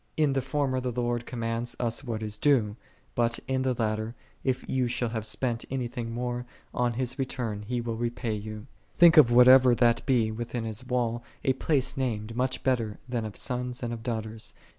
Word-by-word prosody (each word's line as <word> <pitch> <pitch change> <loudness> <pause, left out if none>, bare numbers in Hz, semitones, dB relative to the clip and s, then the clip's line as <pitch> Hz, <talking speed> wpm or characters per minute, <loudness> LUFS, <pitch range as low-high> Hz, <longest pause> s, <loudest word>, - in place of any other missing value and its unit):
In 150 -3 +3
the 135 - +1
former 135 -1 0
the 125 0 -2
Lord 120 0 -1
commands 115 0 -3
us 120 +2 -2
what 115 -4 -3
is 105 -1 -3
due; 110 -4 +2 0.4
but 120 0 +1
in 130 0 0
the 130 -1 +1
latter, 110 0 -1 0.3
if 130 -2 -1
ye 130 -1 +1
shall 120 0 -1
have 110 -1 -4
spent 120 -3 -1
any 130 -2 -2
thing 120 -1 -5
more, 120 +1 -3 0.3
on 120 -1 +1
His 130 +3 -2
return 120 -5 -2
He 120 +3 -2
will 115 -1 -3
repay 120 -1 -2
you.'6 105 +1 -6 0.3
Think 170 -1 +7
of 135 -6 +8
(whatever 125 +1 +8
that 120 -1 +3
be) 120 -5 +3
within 120 +1 -4
His 110 0 -3
wall 120 -2 0 0.2
"a 130 - +3
place 135 0 +1
named, 115 -4 -2
much 130 +1 -1
better 115 -5 0
than 120 -3 -2
of 105 - -7
sons 125 -1 -3
and 120 0 -2
of 115 - -6
daughters."' 110 -2 -4
120 Hz, 195 wpm, -28 LUFS, 115-130 Hz, 0.4 s, of